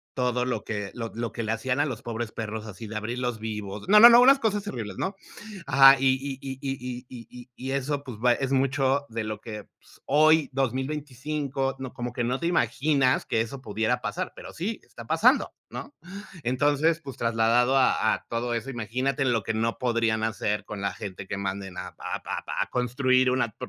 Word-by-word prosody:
todo 125 Hz, -1 st, 0 dB
lo 120 Hz, -5 st, -2 dB
que 105 Hz, -2 st, -4 dB
lo 115 Hz, -2 st, -5 dB
lo 115 Hz, 0 st, -3 dB
que 115 Hz, -, -3 dB
le 110 Hz, -, -1 dB
hacían 125 Hz, +4 st, -1 dB
a 145 Hz, -, +3 dB
los 125 Hz, -5 st, -5 dB
pobres 115 Hz, -1 st, -4 dB
perros 110 Hz, -1 st, -5 dB
así 110 Hz, +1 st, -8 dB
de 110 Hz, -, -8 dB
abrirlos 120 Hz, +1 st, -3 dB
vivos. 105 Hz, -, -5 dB
No, 210 Hz, +1 st, +8 dB
no, 235 Hz, +2 st, +12 dB
no, 235 Hz, +1 st, +8 dB
unas 275 Hz, +2 st, +7 dB
cosas 210 Hz, -4 st, 0 dB
terribles, 120 Hz, -, -6 dB
¿no? 190 Hz, +1 st, -2 dB, 0.5 s
Ajá. 135 Hz, +1 st, +8 dB
Y 135 Hz, -, +3 dB
y 135 Hz, -1 st, -5 dB
y 135 Hz, -1 st, -6 dB
y 125 Hz, -2 st, -5 dB
y 120 Hz, -3 st, -10 dB
y 125 Hz, 0 st, -12 dB
y 130 Hz, -, -10 dB
y -, -, -2 dB
eso, 140 Hz, +1 st, -2 dB
pues, 125 Hz, -6 st, -8 dB
va 125 Hz, 0 st, +4 dB
es 135 Hz, +1 st, -2 dB
mucho 135 Hz, +1 st, +1 dB
de 115 Hz, 0 st, -3 dB
lo 110 Hz, -1 st, -5 dB
que, 105 Hz, -3 st, -7 dB
pues, -, -, -24 dB
hoy 155 Hz, +1 st, +4 dB
2025 135 Hz, +1 st, -2 dB
no, 130 Hz, -2 st, -6 dB
como 120 Hz, 0 st, -5 dB
que 120 Hz, -, -2 dB
no 125 Hz, +3 st, -1 dB
te 170 Hz, -, -1 dB
imaginas 135 Hz, -2 st, +2 dB
que 110 Hz, -, +1 dB
eso 130 Hz, +4 st, -5 dB
pudiera 110 Hz, +2 st, -1 dB
pasar, 105 Hz, -3 st, -3 dB
pero -, -, -10 dB
sí, 200 Hz, +7 st, -4 dB
está -, -, -12 dB
pasando, -, -, +3 dB, 0.2 s
¿no? 290 Hz, -, -8 dB, 0.5 s
Entonces, 145 Hz, +6 st, +2 dB
pues, 135 Hz, -5 st, -8 dB
trasladado 115 Hz, +3 st, +3 dB
a 130 Hz, -, +3 dB
a -, -, -12 dB
todo 120 Hz, +1 st, -2 dB
eso, 115 Hz, +4 st, -4 dB
imagínate 125 Hz, +4 st, -1 dB
lo 115 Hz, -5 st, +1 dB
que 110 Hz, -, -2 dB
no 115 Hz, +1 st, -1 dB
podrían 115 Hz, -3 st, +1 dB
hacer 105 Hz, -1 st, -1 dB
con 105 Hz, -2 st, -7 dB
la 100 Hz, -, -1 dB
gente 95 Hz, -2 st, -7 dB
que 100 Hz, -, -4 dB
manden 95 Hz, -1 st, -4 dB
a 90 Hz, -, -5 dB
a -, -, -5 dB, 0.4 s
a -, -, -11 dB
construir 130 Hz, +1 st, +2 dB
una, 120 Hz, -5 st, 0 dB
125 Hz, 205 wpm, -26 LUFS, 110-135 Hz, 0.5 s, no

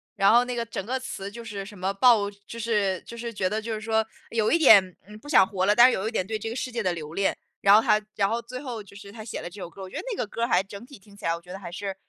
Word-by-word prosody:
然 195 Hz, +1 st, +4 dB
后 240 Hz, +1 st, +6 dB
那 250 Hz, -1 st, -4 dB
个 235 Hz, -1 st, -2 dB
整 205 Hz, -4 st, -5 dB
个 260 Hz, +3 st, -2 dB
词 200 Hz, -6 st, -6 dB
就 235 Hz, +1 st, -9 dB
是 200 Hz, -3 st, -6 dB
什 205 Hz, -1 st, -11 dB
么 190 Hz, +2 st, -1 dB
爆 210 Hz, -1 st, +4 dB, 0.2 s
就 230 Hz, -, -8 dB
是 205 Hz, -5 st, 0 dB
就 235 Hz, -, -9 dB
是 235 Hz, 0 st, -5 dB
觉 190 Hz, -2 st, 0 dB
得 220 Hz, +1 st, -2 dB
就 225 Hz, 0 st, -4 dB
是 215 Hz, -, -3 dB
说， 220 Hz, 0 st, +1 dB, 0.3 s
有 220 Hz, -2 st, +1 dB
一 335 Hz, -, +5 dB
点， 200 Hz, -, +6 dB
嗯， 210 Hz, 0 st, -11 dB
不 290 Hz, -, -13 dB
想 190 Hz, -10 st, +6 dB
活 190 Hz, -3 st, -1 dB
了， 210 Hz, -, +4 dB
但 240 Hz, +1 st, +9 dB
是 -, -, +2 dB
有 195 Hz, +3 st, -2 dB
一 -, -, -9 dB
点 185 Hz, -5 st, -1 dB
对 220 Hz, -1 st, -2 dB
这 225 Hz, +1 st, -5 dB
个 230 Hz, -, -5 dB
世 255 Hz, -1 st, -3 dB
界 235 Hz, -1 st, -2 dB
的 180 Hz, -, +1 dB
留 155 Hz, -1 st, -7 dB
恋， 195 Hz, +1 st, 0 dB, 0.2 s
然 200 Hz, 0 st, +6 dB
后 220 Hz, -, +7 dB
他 215 Hz, -1 st, +3 dB
然 195 Hz, -1 st, +2 dB
后 230 Hz, +1 st, -1 dB
最 255 Hz, +2 st, -8 dB
后 245 Hz, -6 st, -6 dB
就 200 Hz, 0 st, -17 dB
是 200 Hz, -1 st, -11 dB
他 220 Hz, -1 st, -9 dB
写 220 Hz, -, -6 dB
了 175 Hz, -, -6 dB
这 195 Hz, +2 st, -11 dB
首 175 Hz, -, -6 dB
歌。 190 Hz, +3 st, -13 dB
我 185 Hz, -, -8 dB
觉 -, -, -12 dB
得 -, -, -3 dB
那 420 Hz, -, -4 dB
个 -, -, -1 dB
歌 230 Hz, -, -6 dB
儿 -, -, +2 dB
还 185 Hz, -5 st, +3 dB
整 200 Hz, +2 st, -10 dB
体 280 Hz, -2 st, -13 dB
听 200 Hz, +1 st, -19 dB
起 -, -, -17 dB
来 165 Hz, 0 st, +1 dB
我 170 Hz, -, -10 dB
觉 180 Hz, +1 st, -11 dB
得 195 Hz, -, -7 dB
还 175 Hz, -, -8 dB
是 195 Hz, +1 st, -5 dB
210 Hz, 370 characters per minute, -26 LUFS, 195-230 Hz, 0.3 s, 但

